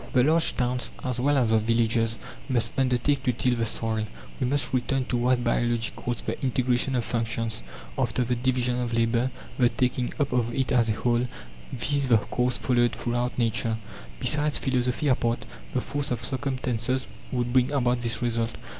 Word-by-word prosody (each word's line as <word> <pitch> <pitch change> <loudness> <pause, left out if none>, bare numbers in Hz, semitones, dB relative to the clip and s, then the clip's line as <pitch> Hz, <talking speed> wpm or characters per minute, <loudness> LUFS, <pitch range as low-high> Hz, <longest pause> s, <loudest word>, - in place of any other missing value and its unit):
The 125 -3 +5
large 160 +4 +3
towns, 125 0 0
as 125 -1 -2
well 140 +3 +2
as 120 -4 +2
the 110 - +4
villages, 115 0 +1 0.3
must 115 -3 +2
undertake 130 +2 +1
to 130 -2 +1
till 125 +1 0
the 115 -1 0
soil. 110 0 -1 0.3
We 130 - 0
must 135 -1 +1
return 130 +1 0
to 125 - -1
what 125 0 +2
biology 120 -1 +1
calls 120 -3 -3
"the - - -4
integration 130 -1 +1
of 120 -2 0
functions" 115 - -1 0.4
after 120 +2 +1
the 125 +1 -1
division 125 0 0
of 120 -1 -2
labour, 115 +2 +2 0.3
the 120 -1 +5
taking 125 0 -1
up 140 -3 0
of 120 -2 0
it 130 -1 0
as 120 -2 +3
a - - +2
whole 120 +2 0 0.4
this 145 - +2
is 140 -1 +4
the 115 -3 +6
course 125 +4 +1
followed 120 -2 +2
throughout 120 +1 -2
Nature. 115 -1 +1 0.4
Besides, 150 0 +4
philosophy 125 +2 0
apart, 120 -3 +1 0.3
the 125 - +2
force 145 +2 -3
of 125 - -2
circumstances 130 -2 -1 0.3
would 120 -1 -1
bring 130 0 +4
about 125 -3 +1
this 115 +1 0
result. 115 -1 -1
125 Hz, 180 wpm, -26 LUFS, 115-130 Hz, 0.4 s, the